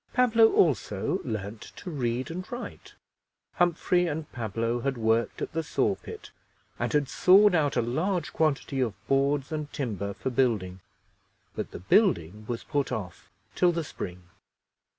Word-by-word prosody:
Pablo 230 -3 +5
also 145 - +1
learned 105 0 -5
to 180 - -9
read 130 0 -2
and 180 +2 -6
write. 245 +1 -8 0.6
Humphrey 175 0 +2
and 155 -1 -4
Pablo 115 0 -2
had 135 +1 -2
worked 115 +1 +1
at - - -4
the 165 - 0
saw 155 - +1
pit, 435 - -10 0.5
and - - -1
had 145 -2 +2
sawed 195 +6 +6
out 145 -6 +2
a - - +3
large 165 +8 -1
quantity 145 -3 0
of 115 -5 0
boards 140 +1 +1
and 150 -2 -4
timber 100 -7 -3
for 130 - -3
building, 110 -8 0 0.8
but - - -4
the - - -8
building 105 - +2
was 120 -1 -4
put 145 -3 -1
off 100 -8 -6 0.2
till 180 -1 +3
the 170 -1 -2
spring. 90 - -7
135 Hz, 150 wpm, -27 LUFS, 115-170 Hz, 0.8 s, sawed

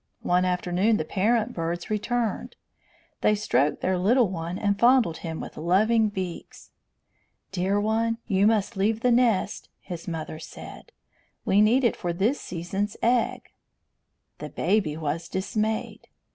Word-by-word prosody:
One 180 +1 +2
afternoon 180 +4 +1
the 155 - -2
parent 215 +5 +1
birds 170 +3 -4
returned. 225 +1 -2 0.7
They 210 - +3
stroked 150 -8 +1
their 185 -1 0
little 230 +4 +3
one 170 0 -4
and 200 -1 0
fondled 240 -9 +4
him 160 -2 -6
with - - -8
loving 215 +7 +3
beaks. 185 -4 -7 0.8
"Dear 190 +2 0
one, 225 +2 0
you 200 -1 +3
must 220 0 +1
leave 215 +3 0
the 250 - +3
nest," 230 -5 +1
his 175 -3 -8
mother 160 -2 -5
said. 160 - -11 0.5
"We 200 +2 +4
need 235 +5 +4
it 235 - +2
for 175 -2 -3
this 210 +11 0
season's 190 +4 -4
egg." 240 0 +1 0.9
The - - -6
baby 185 -8 0
was 160 +2 -3
dismayed. 215 +3 -2
200 Hz, 140 wpm, -26 LUFS, 175-220 Hz, 0.9 s, fondled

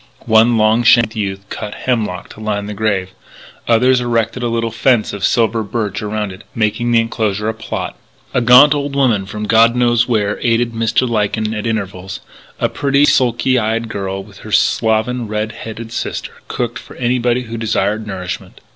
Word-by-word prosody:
One 115 +2 +4
long 110 +2 +3
shanked 115 -1 +4
youth 100 -2 -4
cut 105 -1 -6
hemlock 110 -7 -2
to - - -13
line 105 -2 -2
the 105 - -5
grave; 100 -3 -1 0.6
others 125 +2 +4
erected 115 0 -1
a 120 - 0
little 115 0 -1
fence 115 -1 +1
of 100 -2 -6
silver 115 +1 +2
birch 105 -1 -3
around 105 -1 -3
it, 95 +2 -11
making 110 +1 0
of 120 - +1
the 115 - +5
enclosure 110 -2 -2
a 110 - 0
"plot." 110 - -5 0.4
A 125 - +2
gaunt 125 +5 +7
old 145 -1 -3
woman 115 -8 +2
from 105 +1 -6
God 115 +2 +4
knows 120 -1 +2
where 105 -3 0
aided 120 0 +1
Mr. 115 +3 +1
Lyken 110 -1 -1
at 105 +1 -3
intervals: 95 -4 -4 0.4
a - - +2
pretty, 140 0 +2
sulky 125 -1 +2
eyed 115 +1 -1
girl 95 -1 -4
with 100 -1 -16
her 110 - -10
slovenly, 115 +3 +1
red 105 +1 -2
headed 115 0 -8
sister - - -4 0.2
cooked 120 -1 -3
for - - -13
anybody 125 0 0
who 115 -1 -7
desired 110 -1 -1
nourishment. 95 -3 -6
110 Hz, 180 wpm, -17 LUFS, 105-120 Hz, 0.6 s, gaunt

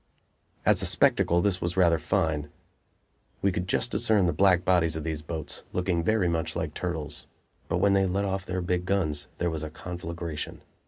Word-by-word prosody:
As - - +5
a - - +2
spectacle 85 0 +3
this 95 -3 +1
was 85 +2 -2
rather 85 -3 +4
fine. 75 -1 0 0.9
We 100 - +4
could 90 0 -3
just 115 +5 0
discern 110 -4 +3
the 85 - +1
black 95 -2 +4
bodies 85 -4 +3
of 80 - -4
these 80 -1 -3
boats, 80 0 -5
looking 90 -2 0
very 110 -1 +2
much 80 -1 -1
like - - -3
turtles. 80 -4 -4 0.4
But - - +1
when 100 -1 +3
they 95 -1 +3
let 100 +2 0
off 95 0 -2
their 95 0 -3
big 90 0 -1
guns 80 -7 0
there 85 -1 0
was 80 -1 -3
a 80 - -4
conflagration. 85 -1 -6
90 Hz, 190 wpm, -27 LUFS, 80-95 Hz, 0.9 s, As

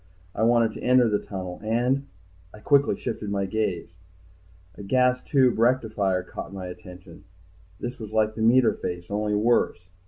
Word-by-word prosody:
I - - -4
wanted 115 0 +3
to - - -9
enter 125 -1 +4
the 105 -2 +1
tunnel 90 -2 -7
and 125 +5 0 0.6
Quickly 140 -1 +3
I - - -15
shifted 110 -3 -5
my 100 -1 -1
gaze. 95 -5 -3 0.8
A 100 - -11
gas 125 +4 +2
tube 130 -5 +2
rectifier 110 -6 +1
caught 90 - -8
my 95 -2 -7
attention. 90 +1 -11 0.6
This 120 +1 -6
was 110 -2 -8
like 110 0 +1
the 110 - -6
meter 120 +2 +4
face, 90 +1 -6
only 105 0 -1
worse. 115 0 +2
110 Hz, 160 wpm, -25 LUFS, 100-120 Hz, 0.8 s, enter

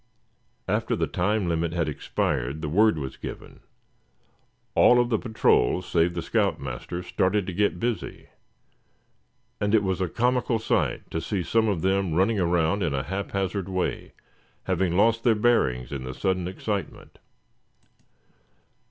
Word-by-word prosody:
After - - 0
the - - 0
time 105 -3 0
limit 85 0 -1
had 85 -2 0
expired 70 0 -2
the 75 - -2
word 105 +3 +4
was 65 -3 -5
given. - - -9 1.1
All 125 - +6
of 120 0 +2
the 110 - +1
patrol 110 - +2
save 85 0 +1
the 85 - -3
scout - - 0
master 70 +7 -5
started 95 +3 0
to 95 - -5
get 100 -1 +1
busy; 115 -4 -4 1.3
and 105 +2 +2
it 105 - +3
was 95 -1 -1
a 90 - 0
comical 125 +3 +1
sight 110 - -1
to 80 - -2
see 95 -1 -2
some 115 +5 +2
of 95 -6 -1
them 95 -3 +1
running 95 +4 +2
around 85 +1 +1
in 80 -6 0
a 65 - -1
haphazard 95 +2 -3
way, 95 -1 -3 0.5
having 90 -1 0
lost 115 +2 +3
their 115 -2 +4
bearings 65 - +1
in 70 -2 -4
the 65 0 -6
sudden 90 -2 -1
excitement. 95 -1 -5
95 Hz, 150 wpm, -25 LUFS, 80-105 Hz, 1.3 s, All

